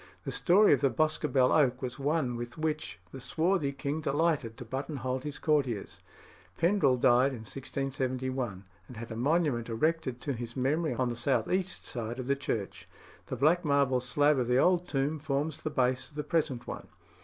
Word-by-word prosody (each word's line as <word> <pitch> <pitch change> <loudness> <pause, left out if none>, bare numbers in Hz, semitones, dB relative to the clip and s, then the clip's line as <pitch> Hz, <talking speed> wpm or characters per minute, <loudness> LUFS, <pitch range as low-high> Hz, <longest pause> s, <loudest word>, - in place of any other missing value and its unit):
The - - -4
story 195 +2 +5
of 140 - +2
the 140 - +4
Boscobel 150 -4 +2
oak 130 -5 +3
was 125 +2 -4
one 140 -3 0
with 120 +4 -6
which 155 -1 -2
the 135 - -8
swarthy 165 0 +1
king 140 +2 -3
delighted 145 -6 0
to 125 - -8
buttonhole 130 0 -3
his 145 +2 -6
courtiers. 135 -9 -1 0.6
Pendrell 165 -7 +3
died 125 +2 +4
in 120 - -7
1671, 130 -3 -3 0.2
and 125 - -11
had 115 +1 -7
a - - -4
monument 135 -2 +1
erected 145 +1 0
to 140 - -2
his 120 0 -6
memory 140 +2 0
on 125 0 0
the 120 - -3
south 120 -1 0
east 185 0 -1
side 120 0 -4
of 130 - -4
the 140 +2 +1
church. 110 -7 -4 0.4
The - - -3
black 155 +8 +3
marble 140 -4 +2
slab 145 +3 +2
of 125 - 0
the 125 0 +3
old 180 +4 +3
tomb 145 +2 -1
forms 145 +1 -2
the - - -2
base 130 0 0
of 150 - -20
the 150 - -2
present 140 -6 -1
one. - - -7
135 Hz, 185 wpm, -30 LUFS, 125-155 Hz, 0.6 s, story